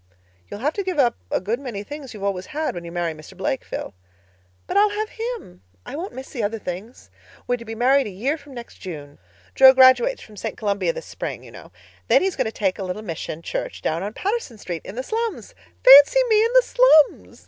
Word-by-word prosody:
"You'll 205 - -8
have 295 +4 0
to 400 - -3
give 370 -3 -3
up 250 -4 +3
a - - 0
good 215 +7 -2
many 235 -7 -6
things 290 +1 -9
you've 200 - -9
always 195 -2 -2
had, 310 +1 -3
when 175 - -7
you 170 - -8
marry 170 -2 -2
Mr. 155 +4 -14
Blake, 250 +7 -2
Phil." - - -6 0.7
"But - - -5
I'll 415 +1 +5
have 425 +1 -3
him. 450 - -7 0.2
I - - -7
won't 355 +6 -5
miss 260 +1 -9
the 250 - -4
other 215 +2 -1
things. 205 +4 -8 0.3
We're 245 - 0
to 235 - -11
be 225 0 -6
married 265 +3 +3
a - - -5
year 230 +10 -2
from 285 -3 -14
next 235 -1 -10
June. 145 -6 -9 0.3
Jo 265 0 +8
graduates 265 - +5
from 210 -2 -15
St. - - -5
Columbia 205 - 0
this - - -8
spring, - - -6
you - - -13
know. - - -13 0.4
Then - - +4
he's 380 -2 0
going 260 - 0
to 220 - -2
take 195 -4 -1
a - - -3
little 185 +3 -5
mission 165 -3 -6
church - - -5
down 160 +2 -1
on 205 +2 -4
Patterson 400 - -3
Street 175 -5 -6
in 195 - -9
the 255 - -3
slums. 455 - -4 0.3
Fancy 285 - +9
me 430 0 +5
in 465 - -1
the - - +6
slums! 310 - +3
245 Hz, 230 wpm, -22 LUFS, 195-320 Hz, 0.7 s, Fancy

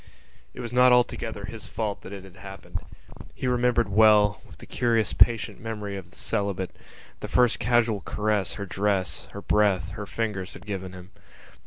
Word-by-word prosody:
It - - -6
was 120 0 -6
not 125 0 +6
altogether 115 -4 +1
his 110 +1 -8
fault 105 -3 -3
that - - -10
it 100 -2 -8
had 95 -2 -15
happened. 95 -2 -8 0.6
He - - -5
remembered 125 -2 +2
well, 105 0 +5
with - - -15
the - - -12
curious 115 -3 +1
patient 115 -2 +3
memory 105 -4 -5
of 95 - -8
the - - -18
celibate, 100 -2 -1 0.4
the - - -5
first 125 -2 +3
casual 115 -2 +2
caresses 105 -2 -1
her 100 - -5
dress, 100 -1 -1
her 100 - -9
breath, 100 -5 +2
her 105 +2 -6
fingers 105 -5 -3
had - - -12
given 95 -3 -5
him. 90 +1 -11
105 Hz, 175 wpm, -26 LUFS, 100-115 Hz, 0.6 s, not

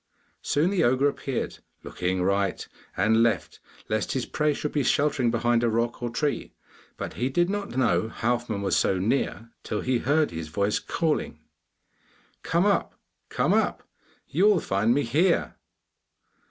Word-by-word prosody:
Soon 160 +6 +1
the 195 - +2
ogre 130 +4 +3
appeared, 135 -2 -3 0.2
looking 90 +1 -2
right 100 0 0 0.3
and 110 +4 +3
left 115 -1 0 0.3
lest 110 0 -1
his 130 -2 -1
prey 150 -1 0
should 150 0 -3
be 145 - 0
sheltering 140 -2 +2
behind 120 0 +1
a 120 - +3
rock 115 +2 -1
or 120 - -2
tree, 145 +5 -2 0.4
but - - -5
he 125 +2 -1
did 175 +6 +1
not 205 -7 -4
know 115 -3 +2
Halfman 115 -3 -2
was 95 - +1
so 95 - +2
near 115 +2 -1
till 105 - -3
he 125 -2 0
heard 150 +5 +2
his 80 -1 -5
voice 100 +6 0
calling, 155 - -1 1.0
'Come 170 +3 +1
up! 205 - +1 0.3
come - - +1
up! - - +1 0.4
you 180 +7 +2
will 210 -4 +5
find 105 -3 +1
me 145 - +2
here! 130 - +1
120 Hz, 155 wpm, -26 LUFS, 110-150 Hz, 1.0 s, will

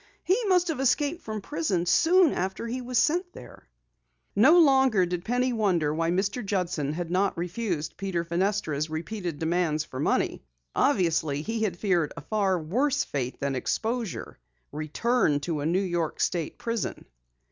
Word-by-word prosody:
"He 435 +6 +1
must 360 -2 +3
have 310 - -2
escaped 285 +6 +1
from 215 -1 -5
prison 240 - -1
soon 340 - +4
after 190 +5 -3
he 245 +2 -3
was 250 0 -2
sent 355 +6 +1
there!" - - -13 0.7
No 270 - +6
longer 265 - +5
did 175 0 -3
Penny 245 +4 0
wonder 180 -9 +1
why 165 +1 0
Mr. 195 +7 0
Judson 180 -7 -1
had 170 +1 -4
not 190 +1 +1
refused 175 -3 -3
Peter 185 -3 -2
Fenestra's 170 -3 -1
repeated 170 +1 -4
demands 160 -1 0
for 130 -3 -8
money. - - 0 0.3
Obviously 160 - +1
he 225 +3 -3
had 195 -6 -1
feared 175 -6 +1
a - - -5
far 200 -4 0
worse 260 - 0
fate 130 -3 -4
than 140 0 -1
exposure 225 - -3 0.3
return 155 - +1
to 155 0 -2
the 145 - -1
New 185 +4 +1
York 175 -4 -2
state 165 -4 -1
prison. 230 -2 -3
190 Hz, 160 wpm, -27 LUFS, 165-245 Hz, 0.7 s, No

